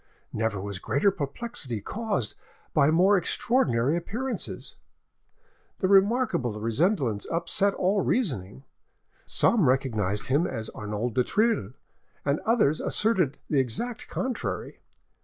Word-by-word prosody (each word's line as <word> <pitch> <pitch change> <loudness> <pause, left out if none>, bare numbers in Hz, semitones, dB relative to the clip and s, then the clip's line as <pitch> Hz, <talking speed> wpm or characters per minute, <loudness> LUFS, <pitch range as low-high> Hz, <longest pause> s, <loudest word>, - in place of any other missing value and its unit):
Never 110 -2 -1
was 100 -1 -5
greater 140 - +2
perplexity 145 - -3
caused 190 - -2 0.4
by 145 -1 +4
more 185 +5 +5
extraordinary 150 - +1
appearances. 235 +10 -3 1.0
The 190 - 0
remarkable 195 - +2
resemblance 115 - 0
upset 175 +4 +1
all 195 +2 +1
reasoning: 135 - -1 0.6
some 210 - +3
recognised 110 -7 0
him 145 +7 +2
as 110 -8 -5
Arnauld 105 +3 -4
du 125 - +2
Thill, 210 - +1 0.5
and 140 +1 +1
others 210 -11 +3
asserted 185 -10 +1
the 145 - +2
exact 135 - -2
contrary. 255 -2 -4
150 Hz, 110 wpm, -27 LUFS, -, 1.0 s, more